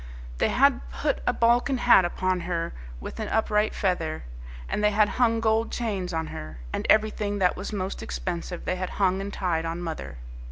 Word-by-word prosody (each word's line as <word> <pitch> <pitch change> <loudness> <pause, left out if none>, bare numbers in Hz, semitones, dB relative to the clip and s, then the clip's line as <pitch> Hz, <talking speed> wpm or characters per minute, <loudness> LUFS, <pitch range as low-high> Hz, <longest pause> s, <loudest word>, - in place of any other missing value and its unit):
They - - +3
had - - +4
put 60 0 -1
a - - +5
Balkan 240 +3 +3
hat 240 -6 +6
upon 185 +1 0
her 170 -1 -2 0.3
with 60 - -7
an 215 - -2
upright 215 -1 +1
feather, 165 -5 -1 0.4
and 210 - -2
they 210 - +5
had 210 0 +4
hung 230 -2 +4
gold 225 0 +1
chains 200 -6 -2
on 160 -1 -1
her, 75 -4 -7 0.2
and - - -2
everything 215 -1 +2
that 185 -2 +2
was 195 +4 -5
most 195 -2 -3
expensive 175 -1 -4
they 185 - -1
had 185 0 -3
hung 190 -1 +2
and 200 +1 -4
tied 175 -5 -1
on 165 +1 -3
mother. 165 - -5
190 Hz, 190 wpm, -26 LUFS, 175-215 Hz, 0.4 s, hat